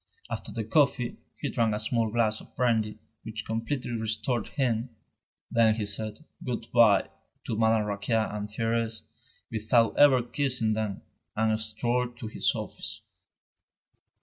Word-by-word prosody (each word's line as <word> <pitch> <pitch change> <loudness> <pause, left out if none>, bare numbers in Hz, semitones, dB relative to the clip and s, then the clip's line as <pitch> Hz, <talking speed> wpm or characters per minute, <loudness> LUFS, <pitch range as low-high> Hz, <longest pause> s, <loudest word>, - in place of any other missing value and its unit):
After 115 - -4
the 115 - -3
coffee, 125 0 +2 0.2
he - - -2
drank 115 -2 +1
a - - -2
small 115 +1 0
glass 110 -1 +1
of - - -17
brandy 110 -4 +1 0.2
which 110 0 -6
completely 115 +3 -2
restored 110 +1 -1
him. 125 -4 0 0.6
Then 115 -2 +4
he 110 -2 -2
said 110 +7 -3 0.2
"good 120 -2 -4
bye" 110 -5 +5 0.3
to 115 - -2
Madame 110 -1 +3
Raquin 105 +3 -1
and 105 -1 -2
Thérèse, 115 +1 -1 0.5
without 115 +1 +2
ever 135 -4 +7
kissing 120 -3 0
them, 110 -3 -3 0.3
and 110 0 +2
strolled 120 +3 -1
to 120 - -7
his 110 - +2
office. - - -3
115 Hz, 140 wpm, -28 LUFS, 110-120 Hz, 0.6 s, ever